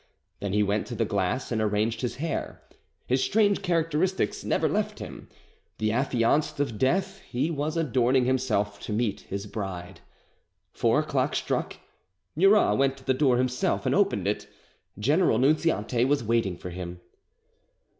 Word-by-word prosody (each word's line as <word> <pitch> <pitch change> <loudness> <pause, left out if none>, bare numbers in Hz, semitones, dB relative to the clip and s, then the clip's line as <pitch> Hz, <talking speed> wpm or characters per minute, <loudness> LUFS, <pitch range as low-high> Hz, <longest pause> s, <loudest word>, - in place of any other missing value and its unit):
Then 100 -1 -3
he 105 0 +3
went 100 +1 0
to 120 - -5
the 115 - 0
glass 100 +5 -1
and 110 -2 0
arranged 110 +2 0
his 125 - -2
hair. 160 +1 -4 0.4
His 130 +1 +1
strange 205 -2 +2
characteristics 165 - 0
never - - +1
left - - -1
him. - - -9 0.5
The 110 0 0
affianced 130 +4 +1
of 115 -7 -1
Death, 190 +8 +1
he 130 +7 -1
was 155 +2 -2
adorning 130 -4 +2
himself 110 -6 0
to 105 - -5
meet 110 -1 0
his 100 +1 -4
bride. 95 -4 -6 0.7
Four - - +2
o'clock - - -1
struck. - - -2 0.6
Murat 195 - +4
went 135 0 +2
to 130 - -16
the 130 - +3
door 130 -2 +3
himself 125 0 0
and - - +2
opened - - +2
it. - - -2 0.5
General 145 - +3
Nunziante 130 -4 +2
was 140 -1 +1
waiting 110 -5 0
for 90 - -7
him. 90 0 -7
125 Hz, 155 wpm, -27 LUFS, 105-150 Hz, 0.7 s, Murat